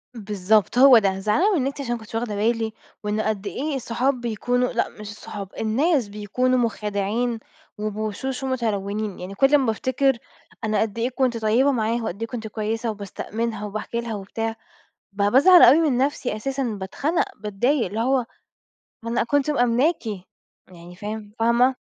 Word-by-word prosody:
بالضبط، 210 +1 +1
هو 260 -1 +9
ده 195 -3 +1
زعلانة 300 - +2
وإن 290 -9 +1
أنتِ 280 0 -4
عشان 240 -3 -2
ما 235 - -3
كنتش 220 +1 -10
واخدة 225 -3 -2
بالي، 225 +1 0 0.3
وإن 210 +1 -1
قد 210 -2 -2
إيه 295 +2 -3
الصحاب 250 +1 -1
بيكونوا 245 +2 0
لأ 235 - 0
مش 210 -1 -10
الصحاب، 205 -2 -8
الناس 255 +3 +1
بيكونوا 215 +5 0
مخادعين 220 +1 -1 0.4
وبوشوش 215 +5 -3
ومتلونين، 215 -5 -2
يعني 185 +2 -7
كل 270 +6 +4
أمّا 260 -6 +3
افتكّر 260 +3 +1 0.5
أنا 215 -1 +1
قد 220 -1 -2
إيه 240 +2 +1
كنت 255 -2 0
طيبة 230 +6 +3
معاها، 230 -1 0
وقد 220 0 -5
إيه 230 - -2
كنت 230 -2 -5
كويسة 225 +2 -2
وباستأمنها 210 +2 -4
وباحكي 215 +3 -4
لها 230 -2 -4
وبتاع 225 +3 -4 0.6
ب 200 - -3
بازعل 355 +7 +7
أوي 280 +7 +8
من 250 - +1
نفسي 260 -4 0
أساسًا، 270 +5 -2
باتخنق، 230 - -1
باتضايق، 225 +6 0
اللي 205 +5 -4
هو 255 +1 +2 0.8
ما 230 - -5
أنا 235 0 +1
كنت 285 +3 +1
مأمناكِ 245 +2 +2 0.7
يعني 175 0 -13
فاهم 210 +1 -6
فاهمة؟ 235 +3 +3
230 Hz, 160 wpm, -23 LUFS, 210-255 Hz, 0.8 s, هو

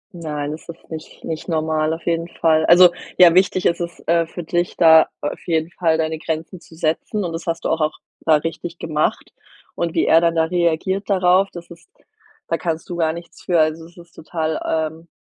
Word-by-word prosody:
Nein, 150 -3 -4
das 155 +2 -9
ist 170 - -11
nicht 160 -1 -9
nicht 160 -1 -5
normal 155 -1 0
auf 165 +1 -5
jeden 165 0 -1
Fall. 160 -2 +1
Also, 175 0 +8 0.3
ja, 175 -2 +8
wichtig 185 0 +2
ist 170 - +2
es, 170 0 -5
äh, 170 0 +2
für 175 +1 -7
dich, 175 +2 -2
da 160 -2 +7
auf 145 - -4
jeden 165 0 0
Fall 165 -3 +1
deine 160 0 -2
Grenzen 165 +3 -4
zu 160 - -17
setzen, 165 +6 -1
und 170 - -4
das 165 +1 -6
hast 165 0 -3
du - - +1
auch 160 -1 0
auch 155 - 0 0.2
da 160 - +3
richtig 165 +3 -4
gemacht. 155 -2 -2 0.4
Und 170 -1 -3
wie - - +2
er 165 - +5
dann 170 0 +1
da 160 - +3
reagiert 175 +4 0
darauf, 185 0 +3
das 170 -1 -11
ist 170 - -15 0.6
da - - 0
kannst 165 -2 -3
du 175 - -4
gar 160 -2 +1
nichts 170 +1 -11
für. 175 -3 +1
Also, 155 +1 +1
es 170 +2 -18
ist 170 0 -15
total 160 -1 -3 0.3
ähm, 165 +1 -17
165 Hz, 215 wpm, -20 LUFS, 160-175 Hz, 0.6 s, Also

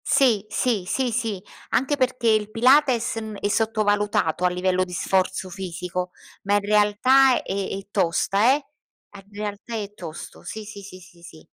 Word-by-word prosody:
Sì, 230 -7 +3
sì, 220 -2 0
sì, 255 +4 0
sì 225 -5 -2 0.3
anche 270 +3 +1
perché 255 -3 0
il 215 -1 +2
pilates, 250 +1 +3
mhmm, 220 -1 -5
è - - -1
sottovalutato 205 -5 +1
a - - +4
livello 180 +1 0
di 180 -1 -8
sforzo 185 +1 0
fisico 180 0 -5 0.3
ma 200 +1 +2
in - - +4
realtà 215 +6 +4
è 195 - -3
è 195 0 -6
tosta, 200 +6 +2
eh. 290 -1 -6 0.5
In 195 -1 -11
realtà 205 +2 -6
è 205 -2 -5
tosto 170 -5 -9
sì, 220 - -7
sì, 205 -1 -10
sì, 190 -2 -11
sì, 175 -1 -18
sì. 160 -2 -14
205 Hz, 165 wpm, -23 LUFS, 185-230 Hz, 0.5 s, a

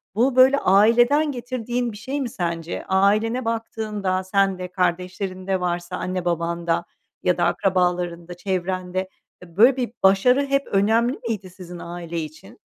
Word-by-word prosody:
bu 250 +4 +2
böyle 260 +2 +6
aileden 240 +9 +4
getirdiğin 245 -1 -3
bir 210 - -10
şey 270 +6 -4
mi 250 - -2
sence? 170 -4 -4
Ailene 215 +6 +2
baktığında, 215 -4 -2
sen 195 0 +1
de, 180 - -4
kardeşlerin 185 +1 -2
de 190 -1 +1
varsa, 175 0 -3
anne 185 -1 -3
babanda 170 0 -1 0.4
ya - - +2
da - - +1
akrabalarında, 180 -2 0
çevrende, 185 0 -3 0.3
eee, 175 -1 -15
böyle 245 +5 +6
bir 245 -3 -2
başarı 250 +9 +4
hep 275 0 0
önemli 225 +6 +2
miydi 200 -5 -3
sizin 180 -1 -10
aile 170 -1 -6
için? 155 -1 -9
190 Hz, 145 wpm, -23 LUFS, 180-230 Hz, 0.4 s, böyle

